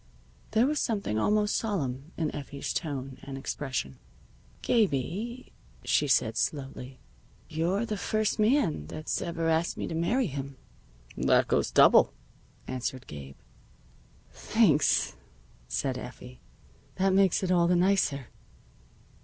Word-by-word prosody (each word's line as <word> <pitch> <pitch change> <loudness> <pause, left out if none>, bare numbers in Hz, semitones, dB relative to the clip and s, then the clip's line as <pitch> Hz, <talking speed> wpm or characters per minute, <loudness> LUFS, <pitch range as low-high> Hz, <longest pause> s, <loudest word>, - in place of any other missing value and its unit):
There 225 +2 +3
was 300 +1 0
something 200 - -1
almost 210 - +2
solemn 150 - -2
in 160 -3 -1
Effie's 140 -1 -5
tone 135 -5 -4
and 135 -1 -7
expression. 130 - -4 0.6
"Gabie," 215 - 0 0.3
she - - +2
said - - +2
slowly, 135 -2 -3 0.5
"you're 175 +8 0
the 215 -2 -3
first 215 +4 0
man 215 - +2
that's 155 - -3
ever 165 -1 -2
asked 165 +1 +1
me - - -3
to - - -5
marry 215 +11 +1
him." 140 -4 -5 0.6
"That - - +3
goes - - +1
double," - - +6 0.5
answered 130 0 -4
Gabe. 70 -2 -9 1.0
"Thanks," - - +2 0.5
said 130 - -2
Effie. 125 0 -10 0.5
"That 190 0 +2
makes 195 -1 +3
it 185 - 0
all 175 -1 +4
the 180 - +3
nicer." 175 -8 +1
165 Hz, 120 wpm, -28 LUFS, 135-200 Hz, 1.0 s, double